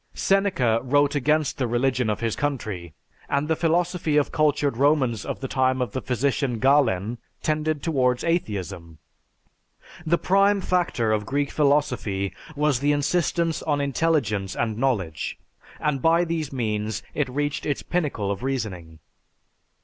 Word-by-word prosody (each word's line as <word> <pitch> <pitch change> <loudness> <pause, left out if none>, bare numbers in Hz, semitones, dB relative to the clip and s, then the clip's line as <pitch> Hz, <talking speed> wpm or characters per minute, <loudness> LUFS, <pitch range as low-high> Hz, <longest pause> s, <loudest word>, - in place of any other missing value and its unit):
Seneca 185 - +2
wrote 145 +3 +2
against 150 +1 +1
the 130 - +1
religion 125 0 +1
of 105 - -2
his 115 -2 -1
country, 105 - -3 0.3
and 140 +2 0
the 160 - +2
philosophy 170 -1 +1
of 145 - +2
cultured 150 -3 +1
Romans 135 -5 +2
of - - -5
the 135 - -3
time 130 -1 +1
of 125 -4 -1
the 130 - -3
physician 130 0 0
Galen 120 -5 +2 0.2
tended 155 -1 -1
towards 130 -6 +1
atheism. 95 - -2 1.1
The 170 +1 +2
prime 195 +3 +3
factor 175 - 0
of 105 -1 0
Greek 140 +1 -1
philosophy 125 - +1 0.2
was 145 -3 +1
the 145 +2 +2
insistence 165 +2 0
on 145 -2 0
intelligence 135 -9 0
and 110 -2 -1
knowledge, 105 -11 -1 0.4
and 150 -3 -1
by 165 +3 +4
these 160 -4 -3
means 110 -4 -2
it 145 -4 -1
reached 145 +3 -2
its 145 - -1
pinnacle 140 - -1
of 100 - -4
reasoning. 100 -12 -4
135 Hz, 140 wpm, -24 LUFS, 115-150 Hz, 1.1 s, by